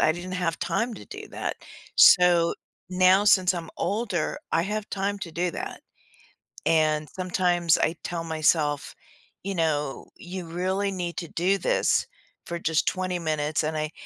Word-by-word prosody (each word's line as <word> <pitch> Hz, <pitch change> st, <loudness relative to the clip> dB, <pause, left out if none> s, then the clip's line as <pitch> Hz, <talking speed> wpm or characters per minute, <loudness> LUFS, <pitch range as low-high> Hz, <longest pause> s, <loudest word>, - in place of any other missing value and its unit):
I 155 Hz, -, +4 dB
didn't 180 Hz, +2 st, -7 dB
have 175 Hz, -3 st, -1 dB
time 225 Hz, +7 st, -1 dB
to -, -, -11 dB
do -, -, -9 dB
that. -, -, -4 dB, 0.4 s
So, 175 Hz, -2 st, +6 dB, 0.4 s
now 185 Hz, +2 st, +5 dB
since 190 Hz, -4 st, +5 dB
I'm 170 Hz, -2 st, -6 dB
older, 205 Hz, -5 st, -1 dB
I 165 Hz, -, +3 dB
have 210 Hz, +2 st, -3 dB
time 200 Hz, +1 st, -2 dB
to 170 Hz, -, -6 dB
do 175 Hz, +1 st, -1 dB
that. -, -, -6 dB, 0.8 s
And 155 Hz, -1 st, +2 dB
sometimes 180 Hz, -2 st, +1 dB
I 165 Hz, -, +1 dB
tell 170 Hz, -1 st, -3 dB
myself, 155 Hz, -2 st, 0 dB, 0.5 s
you 195 Hz, +1 st, -3 dB
know, 150 Hz, -4 st, -1 dB
"You 180 Hz, 0 st, -7 dB
really 190 Hz, +4 st, -1 dB
need 175 Hz, -2 st, -4 dB
to 170 Hz, -, -4 dB
do 185 Hz, +4 st, +1 dB
this -, -, +2 dB, 0.4 s
for 170 Hz, 0 st, -4 dB
just 160 Hz, -1 st, +1 dB
20 185 Hz, -1 st, -1 dB
minutes," 155 Hz, -1 st, -1 dB
and 155 Hz, +1 st, -2 dB
I 155 Hz, 0 st, -2 dB
175 Hz, 160 wpm, -26 LUFS, 160-185 Hz, 0.8 s, So